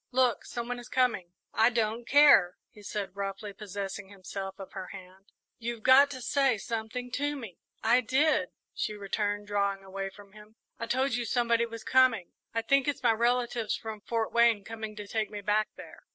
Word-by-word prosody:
"Look, 250 -2 +2
some 235 -1 -5
one 245 0 -3
is 240 - -11
coming!" 240 -9 +1 0.2
"I 225 +2 +5
don't 230 0 -1
care," 285 -11 +6
he 210 - -15
said, 200 -1 -5
roughly, 200 +1 -5
possessing 200 -1 -6
himself 195 0 -7
of 195 - -9
her 190 -2 -6
hand; 190 +1 -13 0.3
"you've 235 -1 -5
got 270 +2 +7
to 260 -3 -7
say 270 -2 +2
something 230 +3 -4
to 290 +3 -1
me!" 230 -10 -9 0.2
"I 240 +3 +4
did," 290 +6 +2 0.2
she 210 - -3
returned, 205 0 -2
drawing 200 -1 -1
away 195 0 -5
from 200 +1 -16
him, 210 +1 -16 0.2
"I 230 - -4
told 260 +2 +1
you 240 +1 0
somebody 235 0 +1
was 230 -1 -8
coming. 255 -8 +3 0.2
I 230 0 -1
think 275 +3 +3
it's 290 -2 -2
my 240 - +5
relatives 235 -1 0
from 220 -2 -7
Fort 225 +1 -2
Wayne 235 -3 +4
coming 220 0 -7
to 210 -1 -7
take 220 0 -1
me 210 -1 -6
back 210 +1 +1
there." - - -12
225 Hz, 190 wpm, -29 LUFS, 200-245 Hz, 0.3 s, got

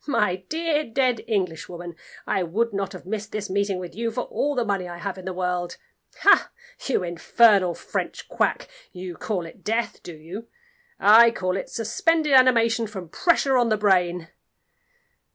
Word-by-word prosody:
"My 210 -9 +1
dear, 310 - -1
dead 250 -2 0
Englishwoman, 175 -4 -3 0.3
I 195 - 0
would 210 +7 -1
not 195 0 -3
have 185 - -10
missed 215 +2 -5
this 210 -2 -4
meeting 200 -1 0
with 180 -1 -7
you 230 +2 -2
for 230 +2 -3
all 290 0 -2
the 245 -2 0
money 195 -3 -1
I 175 - -7
have 190 +2 -5
in 185 - -11
the 190 - -3
world. 180 -1 -3 0.4
Ha! - - +5 0.4
you 255 -8 +1
infernal 180 +1 +3
French - - -5
Quack, - - -1 0.2
you 180 0 -7
call 185 -1 -3
it 165 - -13
death, 225 +2 -2
do 170 - -9
you? 175 +9 -9 0.5
I 230 +3 +8
call 185 -5 -2
it 195 - -4
suspended 310 - 0
animation 235 -3 +4
from 190 -5 -8
pressure 275 - +2
on 240 -2 +2
the 215 - +2
brain!" 180 -4 +1
205 Hz, 170 wpm, -24 LUFS, 180-235 Hz, 0.5 s, I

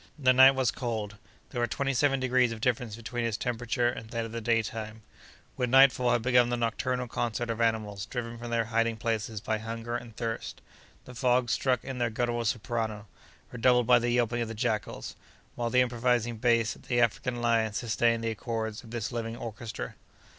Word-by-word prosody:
The 130 -3 +4
night 130 +1 +8
was 130 -3 +2
cold. 110 -5 -4 0.3
There 120 - -2
were 120 - +2
twenty 135 +3 -1
seven 135 +1 +2
degrees 130 -1 +2
of 115 - -6
difference 120 -2 -1
between 115 +1 -4
its 115 -3 -1
temperature 120 0 -1
and 115 -2 -4
that 115 -1 -2
of 115 - -8
the 115 0 -4
daytime. 110 -1 -2 0.5
With 125 - -1
nightfall 130 -1 +6
had 120 -2 +1
begun 125 -1 +4
the 120 - 0
nocturnal 125 +2 -1
concert 120 0 -2
of 115 0 -3
animals 110 -3 0
driven 115 -1 -5
from 120 0 -6
their 115 -1 +1
hiding 115 0 0
places 110 -1 -2
by 110 0 -1
hunger 115 +2 -5
and 120 -2 -7
thirst. 115 -1 -4 0.5
The 125 - -10
frogs 125 -1 +2
struck 130 -1 +1
in 130 -2 -5
their 120 -1 +1
guttural 120 +1 -1
soprano, 110 -1 -2 0.5
redoubled 125 0 +3
by 125 0 +6
the 120 +1 -1
yelping 120 0 +1
of 115 - -1
the 115 - -6
jackals, 110 -2 -2 0.4
while 120 -1 -2
the 125 +1 +4
imposing 120 -1 +1
bass 115 -1 +2
of - - -18
the 120 -1 +1
African 120 0 +1
lion 115 -2 +2
sustained 115 +1 +1
the 115 - 0
accords 110 +1 -4
of 115 - -13
this 115 0 -4
living 115 -1 -4
orchestra. 115 0 -6
120 Hz, 195 wpm, -29 LUFS, 115-125 Hz, 0.5 s, night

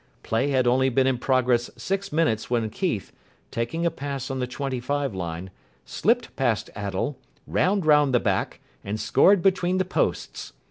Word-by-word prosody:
Play 115 +5 0
had 130 -2 +2
only 130 +2 +3
been 130 +1 +2
in 130 -2 +1
progress 125 -2 +2
six 195 +9 -3
minutes 150 -9 +1
when 115 -3 0
Keith, 165 - -2 0.4
taking 120 +9 -2
a 170 - +2
pass 140 -2 -5
on 135 - -3
the 125 - -1
twenty 130 0 -3
five 140 0 -2
line, 90 0 -5 0.3
slipped 230 - 0
past 120 -7 0
Attell, 100 +7 -3 0.3
ran 195 +5 +1
round 150 -3 +4
the 120 - +4
back, - - -1 0.2
and 105 +2 -4
scored 170 - +4
between 185 -1 +2
the 185 - +1
posts. 185 - -2
130 Hz, 170 wpm, -25 LUFS, 115-160 Hz, 0.4 s, round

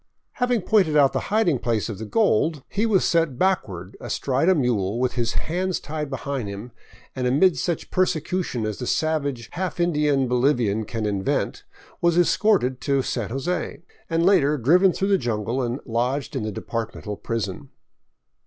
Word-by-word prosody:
Having 245 -5 0
pointed 180 -9 +3
out 140 -2 +5
the - - +1
hiding 200 - +2
place 115 -2 -1
of 110 -4 -6
the 110 - -6
gold, 160 - +1
he 210 +3 0
was 200 -4 +3
set 165 -6 +1
backward 100 - -1
astride 135 +6 0
a 190 - +5
mule 115 - 0
with 125 -1 0
his 120 -2 -1
hands 180 +2 -1
tied 150 0 -5
behind 135 -3 -3
him 100 +5 -7 0.4
and, 125 -1 -1
amid 155 +8 +4
such 170 -3 -3
persecution 175 -8 0
as 110 -1 -4
the 125 - -4
savage, 145 -6 -1
half 180 0 -4
Indian 150 -6 +2
Bolivian 120 -4 +1
can 110 0 -3
invent, 100 -2 -1 0.4
was 170 -1 +3
escorted 175 - +2
to 140 -1 +1
San 115 -6 -3
Jose, 160 +6 -3 0.3
and 165 0 +1
later 150 -6 +4
driven 175 - +4
through 195 +3 -1
the 195 -2 +3
jungle 115 +1 -1
and 120 +2 -2
lodged 125 +4 -1
in - - -1
the 110 0 -3
departmental 110 0 -5
prison. 115 +4 -4
140 Hz, 165 wpm, -23 LUFS, 115-175 Hz, 0.4 s, out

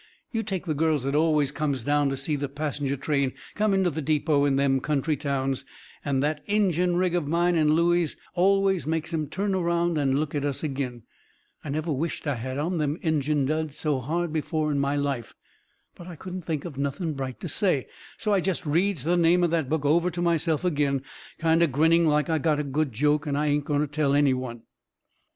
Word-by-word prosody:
You 225 - -1
take 195 -4 -4
the 160 - 0
girls 155 -2 +1
that 140 +1 -1
always 150 -2 +2
comes 140 -6 -2
down 145 +1 +2
to 135 - -2
see 140 +3 -1
the 140 -1 -3
passenger 145 -1 -2
train 140 -2 0 0.2
come 215 0 +1
into 190 -2 +2
the 160 +2 -3
depot 150 -1 +2
in 140 -1 +2
them 135 -1 +2
country 150 +2 0
towns 135 -1 -2 0.4
and 135 -2 0
that 150 0 -1
Injun 180 -4 +2
rig 180 0 +1
of 175 -5 0
mine 170 +3 +2
and 155 -2 +3
Looey's 170 0 +2 0.2
always 195 -1 +2
made 160 +1 -2
'em 155 -2 -1
turn 195 +6 -2
around 170 -2 +1
and 135 -2 +2
look 150 0 -2
at 145 -2 -1
us 145 0 -2
agin. 130 -5 -3 0.6
I 150 - -6
never 155 +3 -2
wisht 155 +5 -3
I 145 - +1
had 130 +2 -4
on 165 +4 -1
them 150 +1 0
Injun 150 -3 +1
duds 155 0 -2
so 150 -4 0
hard 165 +5 -2
before 155 0 -1
in 140 - 0
my 140 +1 +1
life. 140 -5 -2 0.6
But 175 - -12
I 175 - -8
couldn't 180 +1 -7
think 155 -2 -2
of 145 -6 -7
nothing 145 +4 -2
bright 135 -2 -5
to - - -4
say, 160 -4 +1 0.3
so 210 -2 0
I 195 - +3
jest 185 -2 -2
reads 170 0 +1
the 175 +3 +2
name 175 +1 +4
of 170 - +2
that 160 -6 0
book 155 -1 -1
over 170 +5 +3
to 175 0 -4
myself 165 -1 +1
agin, 145 -5 +1 0.3
kind 165 0 +2
o' 170 - +5
grinning 160 +4 +3
like 150 0 +2
I 160 -2 +1
got 150 0 +1
a - - 0
good 145 +1 -1
joke 150 +6 +1
I 145 +1 0
ain't 145 -1 +1
going 145 -1 +1
to - - +2
tell 145 -1 +1
any 145 -2 +4
one. 125 -3 -5
150 Hz, 220 wpm, -26 LUFS, 140-170 Hz, 0.6 s, o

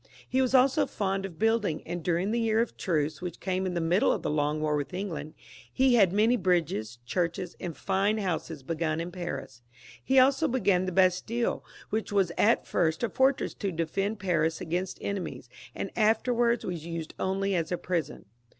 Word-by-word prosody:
He 260 - +1
was 260 0 +2
also 260 +1 +4
fond 195 -1 -2
of 170 -4 -14
building, 220 -7 +1
and 175 0 -4
during 175 +4 0
the 235 - +1
one 230 - 0
year 220 0 +2
of 235 - 0
truce 155 -4 -1
which 180 -2 -5
came 185 0 -1
in 180 - -3
the - - +1
middle 170 +4 +3
of - - -2
the - - -1
long 150 0 0
war 155 -1 0
with 145 +4 -3
England, 175 -5 -5 0.4
he 260 -1 +3
had 200 -7 +5
many 215 +5 +3
bridges, 165 - 0
churches, 175 +5 -2
and 170 -3 -5
fine 200 +2 +1
houses 165 -7 -3
begun 160 +2 -1
in 170 +2 -4
Paris. 140 -8 -6 0.4
He 265 - +2
also 270 +4 +5
began 200 -8 +2
the - - -1
Bas 185 0 +3
tiUe, 235 +1 -1 0.3
which 220 0 -2
was 195 -4 +2
at 225 +3 +3
first 160 +1 0
a 235 - +1
fortress 265 +1 +2
to 200 -2 -3
defend 195 +6 -2
Paris 165 -4 0
against 180 +2 -3
enemies, 200 -3 -4 0.3
and - - -4
afterwards 235 +2 +2
was 175 -4 -4
used 165 -1 -5
only 195 +1 0
as 165 -2 -1
a 180 - 0
prison. 170 -6 -3
185 Hz, 195 wpm, -28 LUFS, 165-215 Hz, 0.4 s, had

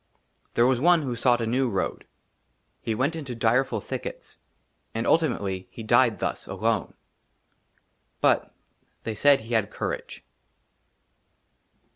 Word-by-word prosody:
THERE 120 - +5
WAS 125 -1 +3
ONE 170 +2 +4
WHO 125 -3 -3
SOUGHT 120 0 +2
A - - 0
NEW 125 +3 +1
ROAD. 95 -4 -2 0.8
HE 110 - -2
WENT 140 +8 0
INTO 140 -6 -5
DIREFUL 120 +3 +1
THICKETS, - - -7 0.6
AND 115 +1 -1
ULTIMATELY 100 - +1
HE 115 - -9
DIED 120 0 +4
THUS, - - -3
ALONE; - - -1 1.2
BUT - - +2 0.5
THEY 110 - -3
SAID 140 +5 +4
HE 115 +2 -7
HAD 110 -3 +2
COURAGE. - - -5
120 Hz, 125 wpm, -26 LUFS, 110-135 Hz, 1.2 s, THERE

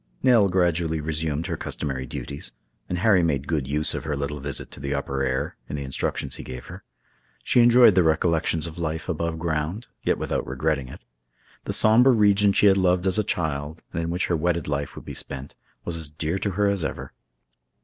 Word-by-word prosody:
Nell 115 -6 +5
gradually 85 -3 +1
resumed 80 0 -2
her - - -2
customary 65 -2 -4
duties, 70 +3 -5 0.4
and 90 - -1
Harry 100 -1 +4
made 70 -5 0
good 75 -5 -1
use 75 +2 +1
of - - -4
her 75 -1 -2
little 70 +1 -3
visit 70 0 -3
to - - -10
the 70 +1 -2
upper 70 -1 -2
air, 65 -1 -2
in - - -3
the 70 - -4
instructions 65 0 -3
he - - -7
gave 65 -1 -8
her. - - -10 0.6
She 120 - +4
enjoyed 120 -2 +7
the 90 - +4
recollections 80 0 +1
of 85 0 -7
life 80 -1 -3
above 85 -1 -2
ground, 80 +6 -2 0.2
yet - - +1
without - - -2
regretting 70 0 -1
it. - - -11 0.6
The - - -2
somber 120 +5 +5
region 105 -2 +4
she 100 - +3
had 100 -1 +6
loved 90 -1 +2
as 95 +2 +2
a - - +2
child, 80 -3 -3
and 85 - -1
in 85 - -2
which 90 +2 0
her 85 - 0
wedded 85 0 0
life 70 -2 -3
would - - -10
be - - -6
spent, 70 +1 -6 0.3
was 85 - -3
as 80 -3 -5
dear 80 +4 -3
to 100 - -1
her 105 +3 +1
as 100 -4 0
ever. - - -5
80 Hz, 210 wpm, -24 LUFS, 75-90 Hz, 0.6 s, enjoyed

